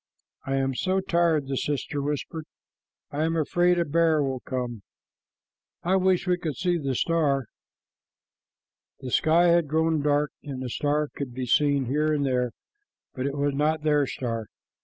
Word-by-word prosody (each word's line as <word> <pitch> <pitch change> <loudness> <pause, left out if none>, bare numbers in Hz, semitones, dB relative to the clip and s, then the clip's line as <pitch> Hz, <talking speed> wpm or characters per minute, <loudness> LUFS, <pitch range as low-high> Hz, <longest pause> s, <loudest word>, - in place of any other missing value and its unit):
"I 135 - 0
am 135 0 0
so 185 +8 0
tired," 170 -5 +1
the 135 - -2
sister 145 +1 -2
whispered. 150 +2 -3 0.7
"I 145 +2 -1
am 165 +1 0
afraid 175 +3 +2
a 170 - +1
bear 160 -1 +2
will 135 -2 -2
come. 125 -4 -4 1.0
I 185 +3 +2
wish 185 0 +2
we 180 -1 +1
could 155 -5 -3
see 180 -2 0
the 135 -3 -2
star." 145 -4 +1 1.6
The 130 -2 -6
sky 170 +6 +4
had 170 -2 +3
grown 160 +1 +1
dark, 145 0 +1
and 135 -3 -6
a 125 - -4
star 150 +3 0
could 130 -4 -5
be 130 -1 -3
seen 140 +1 +2
here 150 +5 +1
and 145 -2 +1
there, 125 -2 +1 0.6
but 130 +1 -2
it 140 +1 -4
was 145 0 +1
not 150 +2 0
their 150 -2 +3
star. 115 -5 -4
150 Hz, 165 wpm, -26 LUFS, 135-165 Hz, 1.6 s, sky